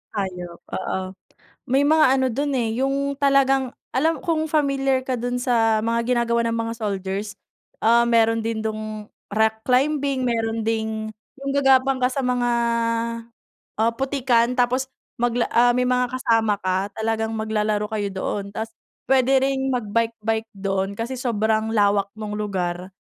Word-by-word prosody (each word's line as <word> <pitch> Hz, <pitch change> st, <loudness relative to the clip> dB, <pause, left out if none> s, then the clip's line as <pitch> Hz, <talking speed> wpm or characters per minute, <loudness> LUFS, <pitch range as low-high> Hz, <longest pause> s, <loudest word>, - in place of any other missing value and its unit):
Hayop, 180 Hz, -3 st, -4 dB
oo. 190 Hz, 0 st, -2 dB, 0.7 s
May 270 Hz, +3 st, +2 dB
mga 315 Hz, 0 st, +5 dB
ano 260 Hz, -, +2 dB
do'n 280 Hz, +4 st, -1 dB
eh, 230 Hz, -2 st, 0 dB
'yung 280 Hz, +1 st, 0 dB
talagang 270 Hz, -2 st, +3 dB, 0.2 s
alam 315 Hz, +4 st, +1 dB
kung 315 Hz, -2 st, 0 dB
familiar 275 Hz, -3 st, +1 dB
ka 255 Hz, -1 st, -1 dB
do'n 245 Hz, +1 st, -2 dB
sa 225 Hz, -3 st, +2 dB
mga 230 Hz, +1 st, +1 dB, 0.2 s
ginagawa 235 Hz, 0 st, +1 dB
ng 230 Hz, -, -1 dB
mga 230 Hz, 0 st, -2 dB
soldiers 200 Hz, 0 st, -3 dB, 0.5 s
ah, 235 Hz, +1 st, +5 dB
meron 225 Hz, -1 st, +3 dB
din 225 Hz, -1 st, -2 dB
dung 215 Hz, -1 st, -5 dB, 0.2 s
rock 220 Hz, 0 st, +1 dB
climbing 275 Hz, 0 st, +1 dB
meron 225 Hz, -2 st, -1 dB
ding 220 Hz, -1 st, -2 dB, 0.3 s
'yung 275 Hz, 0 st, -2 dB
gagapang 270 Hz, -1 st, +4 dB
ka 250 Hz, -, +4 dB
sa 275 Hz, -, -1 dB
mga 250 Hz, -1 st, +1 dB, 1.3 s
ah, 225 Hz, +1 st, +3 dB
putikan 250 Hz, -3 st, +1 dB
tapos 255 Hz, +2 st, +1 dB, 0.3 s
magla 240 Hz, 0 st, +1 dB
ah, 245 Hz, +1 st, +5 dB
may 250 Hz, 0 st, +1 dB
mga 250 Hz, -1 st, +1 dB
kasama 225 Hz, -4 st, +2 dB
ka 185 Hz, +2 st, -1 dB
talagang 220 Hz, 0 st, -1 dB
maglalaro 215 Hz, -1 st, 0 dB
kayo 210 Hz, -2 st, -2 dB
doon. 195 Hz, +1 st, -3 dB
Tas 220 Hz, +2 st, -5 dB, 0.3 s
puwede 265 Hz, 0 st, +4 dB
ring 270 Hz, 0 st, 0 dB
mag-bike 230 Hz, -1 st, -1 dB
bike 225 Hz, 0 st, -1 dB
do'n 195 Hz, 0 st, -2 dB
kasi 230 Hz, +3 st, -3 dB
sobrang 220 Hz, -2 st, 0 dB
lawak 200 Hz, -1 st, +3 dB
nung 210 Hz, -1 st, -5 dB
lugar. 185 Hz, -3 st, -3 dB
230 Hz, 150 wpm, -23 LUFS, 215-260 Hz, 1.3 s, mga